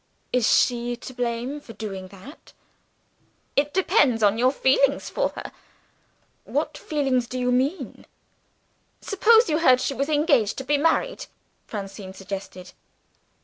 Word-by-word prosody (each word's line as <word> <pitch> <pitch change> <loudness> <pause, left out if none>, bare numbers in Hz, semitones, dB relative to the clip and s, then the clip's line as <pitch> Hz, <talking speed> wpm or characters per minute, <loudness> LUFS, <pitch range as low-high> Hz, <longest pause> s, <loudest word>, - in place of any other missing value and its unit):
"Is 250 -3 +3
she 240 -1 +2
to 250 +2 -10
blame 245 +3 -3
for 230 - -12
doing 195 -4 -6
that?" 200 - -14 1.0
"It 290 +1 +1
depends 280 - +2
on 205 +2 +3
your 255 +2 +4
feeling 275 0 +3
for - - -2
her." - - -7 0.9
"What 295 +2 -2
feeling 280 -4 0
do 245 +1 -5
you 250 0 0
mean?" 270 +8 -2 0.9
"Suppose 450 +3 +4
you 310 0 +1
heard 255 -6 +5
she 275 - -1
was 275 +3 -2
engaged 290 - +2
to 265 - -4
be 285 +2 +1
married?" 330 +11 0 0.4
Francine 195 -2 -7
suggested. 190 -1 -8
255 Hz, 135 wpm, -24 LUFS, 225-295 Hz, 1.0 s, heard